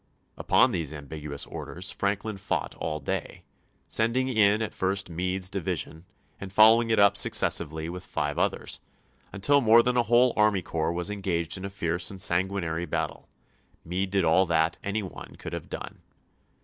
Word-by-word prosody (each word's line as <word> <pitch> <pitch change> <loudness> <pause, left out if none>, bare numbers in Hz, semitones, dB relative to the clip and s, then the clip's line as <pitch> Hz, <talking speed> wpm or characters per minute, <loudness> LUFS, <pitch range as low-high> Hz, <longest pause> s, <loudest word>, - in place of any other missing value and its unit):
Upon - - +3
these 80 -4 -3
ambiguous 75 0 -5
orders 90 +2 -6
Franklin 100 +1 -2
fought 100 +1 -2
all 75 -1 -3
day, - - -4 0.4
sending 120 +4 +1
in 110 -2 +3
at 110 - -4
first 95 -1 -1
Meade's 90 +2 -1
division, 90 -3 -4 0.3
and 95 -1 -7
following 110 +3 +6
it 110 - +2
up 100 0 +5
successively 80 -4 0
with 90 +1 -6
five 75 0 -2
others,^ - - -1 0.5
until 140 +9 +2
more 115 0 +6
than 125 0 +1
a - - +5
whole 120 +1 +5
army 105 -3 +3
corps 80 0 -1
was 85 +3 -2
engaged 90 -5 -2
in 95 - -6
a - - -4
fierce 85 -3 -2
and 95 - -9
sanguinary 90 -2 0
battle. - - -3 0.6
Meade 95 +3 -2
did 95 -1 +1
all 90 +4 +4
that 80 -1 +1
any 100 +2 -2
one 95 - -9
could - - -8
have - - -6
done. - - -7
95 Hz, 165 wpm, -27 LUFS, 85-105 Hz, 0.6 s, following